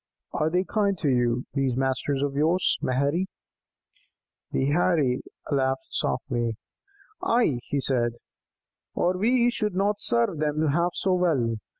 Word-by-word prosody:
'" - - -59
"Are 155 - +2
they 180 +3 +1
kind 200 -1 0
to 150 - 0
you, 120 -1 +1
these 135 -3 0
masters 135 +1 0
of 140 -1 -1
yours, 160 +6 +2
Maherry?" 140 +8 0 1.2
The 135 +2 0
Heirie 150 -6 +2 0.3
laughed 135 -1 0
softly. 120 -3 -1 0.6
"Ay," 230 - +2
he 145 - -1
said, 120 -3 0 0.8
"or 180 +1 +1
we 240 +5 +3
should 210 -5 -2
not 205 +2 0
serve 230 -9 +1
them 155 0 +1
half 170 +4 +1
so 190 - +1
well. 145 -11 +1
150 Hz, 135 wpm, -26 LUFS, 130-185 Hz, 1.2 s, we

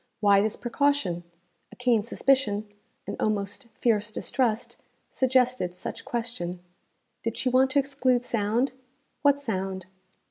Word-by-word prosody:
Why 200 -2 +5
this 215 +1 0
precaution? 240 - 0 0.5
A - - -12
keen 245 -3 +2
suspicion, 215 -2 +1 0.4
an - - -5
almost 210 +3 -1
fierce 220 -2 +1
distrust, 230 -1 -1 0.3
suggested 250 -8 +2
such - - -6
question. 225 -7 -3 0.6
Did 230 0 -3
she 255 - +1
want 260 +1 +4
to 275 - +1
exclude 255 -3 +1
sound? 230 +2 +1 0.5
What 285 -1 +4
sound? 190 -7 -3
235 Hz, 120 wpm, -27 LUFS, 205-260 Hz, 0.6 s, Why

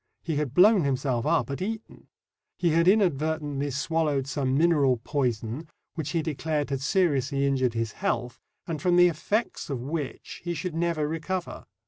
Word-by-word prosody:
He 160 -4 -2
had 145 -3 -2
blown 200 0 +6
himself 130 -2 0
up 165 -3 +1
at 140 - -4
Eton. 220 +3 -6 0.5
He 175 -3 +2
had 165 +2 +3
inadvertently 155 -7 +1
swallowed 150 -1 0
some 135 -1 -1
mineral 150 -6 +3
poison, 120 +2 -2 0.3
which 160 -3 -4
he 165 0 0
declared 150 -1 -2
had 135 -1 -1
seriously 140 - +1
injured 130 -3 +1
his 115 -1 -1
health, 120 +2 -2 0.3
and 160 -3 -4
from 180 -2 +3
the 175 0 +7
effects 205 +4 -2
of 135 -3 -2
which 150 0 -5
he 175 0 -2
should 165 +2 -4
never 165 -2 0
recover. 165 +3 -4
150 Hz, 160 wpm, -27 LUFS, 135-170 Hz, 0.5 s, the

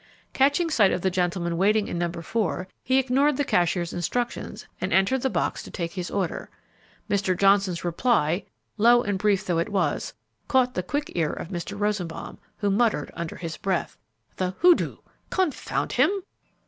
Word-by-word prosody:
Catching 285 +5 +2
sight 210 -9 +4
of - - -1
the 190 - +1
gentleman 175 -1 -1
waiting 210 +2 +3
in 170 - -3
No. 175 -1 0
4, 180 +1 -2 0.2
he 260 +2 +2
ignored 265 +2 +2
the 290 - +2
cashier's 175 -3 +1
instructions 235 +8 -3 0.2
and - - -2
entered 195 +8 +3
the 265 - +1
box - - -1
to - - -10
take 170 -2 -4
his 180 -2 -4
order. 190 -4 -2 0.6
Mr. 195 -3 +1
Johnson's 195 -3 +3
reply, 175 -1 +1 0.3
low 240 +3 +5
and 200 -2 -1
brief 205 -1 +2
though 175 -3 +1
it 170 - -1
was, 200 -2 -1 0.3
caught 255 -2 +3
the 180 - -1
quick 285 +11 -3
ear 160 -3 0
of - - -6
Mr. 195 +2 -5
Rosenbaum, 205 -5 -3 0.2
who 205 -1 0
muttered 215 -7 +1
under 170 -1 -5
his 165 -3 -6
breath, 190 -3 -2 0.4
"The 185 0 -2
hoodoo! 355 -1 +4 0.3
confound 370 -6 -1
him!" - - +4
195 Hz, 170 wpm, -25 LUFS, 175-240 Hz, 0.6 s, low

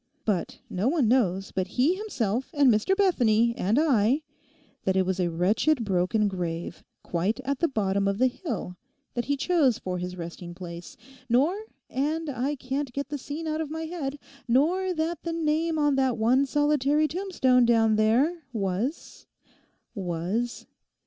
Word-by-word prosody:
But 200 -6 -1
no 190 +6 -1
one 285 -4 +2
knows 195 -6 +1
but 185 0 -1
he 275 +8 +4
himself 265 - -2
and 280 -3 +5
Mr 215 - +1
Bethany 235 - +3
and 205 +6 +1
I, 275 -2 +3 0.6
that 190 - +1
it 190 -1 +3
was 190 0 -1
a 175 -1 +1
wretched 215 - +1
broken 195 +3 +1
grave, 175 -3 -4 0.2
quite 185 +8 -1
at 270 +1 -2
the 335 - +3
bottom 200 -6 0
of 200 0 0
the 255 - +3
hill, 240 - -3 0.4
that 240 - -2
he 285 0 0
chose 280 -6 +2
for 180 -1 -4
his 180 +1 -5
resting 170 0 -7
place, 175 -1 -9 0.3
nor—and 310 - -1
I 270 +3 -1
can't 265 0 -3
get 280 +1 -4
the 290 0 -4
scene 295 +5 -6
out 310 0 -1
of 310 - -4
my 320 +1 -4
head—nor 295 +2 -1
that 320 +1 -2
the 335 - -3
name 320 0 0
on 295 -2 +2
that 260 -2 +2
one 250 +5 +3
solitary 295 +1 +2
tombstone 310 -9 +2
down 225 -2 +4
there 250 +11 +2
was—was... 200 - -4
255 Hz, 155 wpm, -26 LUFS, 200-300 Hz, 0.6 s, and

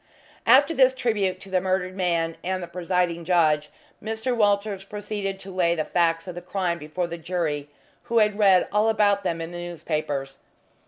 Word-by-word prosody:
After 275 +7 +6
this 260 -3 +4
tribute 205 -7 0
to 195 - -11
the 185 -1 +2
murdered 185 0 -1
man 170 -3 0
and 185 0 -2
the - - -6
presiding 175 -1 -1
judge, 155 -4 +2 0.3
Mr. 220 +3 -2
Walters 205 -2 +1
proceeded 205 -1 -5
to 195 - -9
lay 170 -2 +2
the 155 -2 -1
facts 165 0 +1
of 180 - -5
the 175 - -7
crime 180 -1 -2
before 155 +4 -3
the 170 0 -6
jury, 155 -4 -2 0.4
who 235 - -1
had 210 -1 +3
read 190 -3 +5
all 210 +2 +3
about 205 -2 +2
them 165 - -1
in 165 +1 -5
the 175 - -6
newspapers. 150 -5 -4
185 Hz, 180 wpm, -25 LUFS, 170-205 Hz, 0.4 s, After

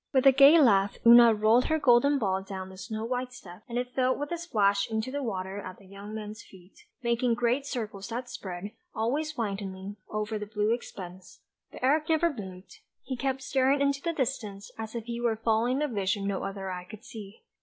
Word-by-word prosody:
With 265 0 +3
a 270 - +9
gay 280 +5 +8
laugh 205 -8 +4
Oona 235 0 +9
rolled 220 +3 +3
her 315 - +1
golden 280 0 +4
ball 190 -6 0
down 190 -1 -7
the 190 - -12
snow 220 +2 -5
white 250 +1 -2
steps, 180 -6 -12
and 235 - -3
it 250 0 -3
fell 255 0 +2
with 290 +2 -5
a 345 - -1
splash 200 - +1
into 220 +3 -2
the 285 +1 -3
water 195 -5 -4
at 185 -1 -8
the 200 - -18
young 200 +2 -9
man's 215 +1 -7
feet, 185 0 -18 0.2
making 235 0 +1
great 245 +4 0
circles 210 -7 -5
that 245 +2 -4
spread, 190 -3 -6 0.2
always 295 +8 -1
widening, 200 -2 -4
over 215 0 -3
the 210 - -6
blue 210 +1 0
expanse; 185 -6 -8 0.3
but - - -11
Eric 300 +4 +2
never 325 0 +2
moved, 190 -5 -10 0.2
he 260 0 -4
kept 265 +1 -2
staring 265 +1 +2
into 280 0 +1
the 335 - -1
distance 235 -9 -3
as 220 +1 -7
if 230 -2 -4
he 235 0 -4
were 235 -2 +1
following 230 +5 +1
a - - +1
vision 200 -4 -1
no 200 -1 -1
other 195 -1 -4
eye 180 -1 -6
could 215 +5 -12
see. 210 -2 -10
225 Hz, 210 wpm, -28 LUFS, 200-255 Hz, 0.3 s, a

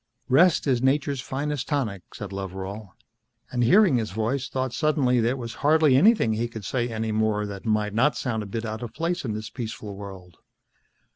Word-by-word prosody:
"Rest 165 +6 +5
is 130 -4 +2
nature's 135 0 +1
finest 145 +2 -3
tonic," 120 - -1
said 105 -2 -7
Loveral, 95 +1 -6 0.6
and 125 -1 0
hearing 175 - +5
his 110 -2 -2
voice 115 +7 -2
thought 130 -2 -2
suddenly 140 -5 +2
there 120 +3 +1
was 120 -2 -6
hardly 150 -2 +4
anything 185 - +5
he 115 +2 -1
could 110 -4 -8
say 120 -2 -1
any 110 -1 -2
more 110 -1 +1
that 100 +1 -7
might 105 -1 +1
not 130 +7 +2
sound 115 -4 -2
a 105 - -6
bit 115 +3 -4
out 110 0 -4
of 120 -2 -7
place 170 +3 -1
in 110 - -2
this 110 +1 -6
peaceful 110 -4 -6
world. 95 -4 -10
115 Hz, 190 wpm, -25 LUFS, 105-135 Hz, 0.6 s, Rest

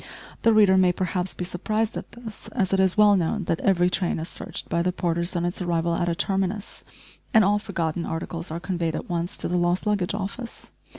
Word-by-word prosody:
The 230 - +5
reader 205 -3 +6
may 185 -1 +5
perhaps 180 0 -2
be 180 - -3
surprised 215 +5 -1
at - - -7
this, 235 -2 -9
as 195 -5 -1
it 195 - +3
is 190 0 +3
well 210 -1 +7
known 190 +3 0
that 165 -1 -1
every 180 -2 +3
train 180 0 0
is 160 +1 -4
searched 185 -2 -6
by 170 - 0
the 180 +1 +1
porters 170 0 -1
on 175 0 0
its 175 +2 -3
arrival 170 -1 0
at 175 +1 0
a 170 - 0
terminus, 195 +3 -2 0.5
and 220 - +8
all 205 +1 +3
forgotten 170 -5 -2
articles 165 +1 -4
are 165 +2 -4
conveyed 170 -3 -2
at - - -5
once 175 +3 -2
to - - -1
the 180 - 0
lost 175 +2 +1
luggage 200 -3 0
office. 210 +4 -6
180 Hz, 220 wpm, -25 LUFS, 170-200 Hz, 0.5 s, and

